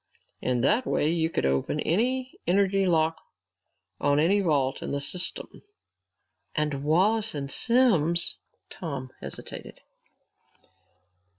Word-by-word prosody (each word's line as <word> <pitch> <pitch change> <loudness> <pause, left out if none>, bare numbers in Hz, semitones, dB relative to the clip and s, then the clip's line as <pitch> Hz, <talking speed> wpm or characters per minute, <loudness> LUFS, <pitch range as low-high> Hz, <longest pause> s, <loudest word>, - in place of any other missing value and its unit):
In 125 -1 0
that 215 - +2
way 150 - +1
you 165 -1 +1
could 165 - -1
open 70 - 0
any 255 +9 0
energy 195 +1 +2
lock 160 -2 +2 0.8
on 145 0 +2
any 185 +7 +3
vault 145 -8 0
in - - -5
the 140 - -2
system." 175 +6 -3 0.9
"And 150 -3 -1
Wallace 200 +7 +2
and 140 -1 -4
Simms 180 - +3 0.2
" - - -51
Tom 135 -7 -6
hesitated. - - -8
165 Hz, 115 wpm, -26 LUFS, 145-200 Hz, 0.9 s, any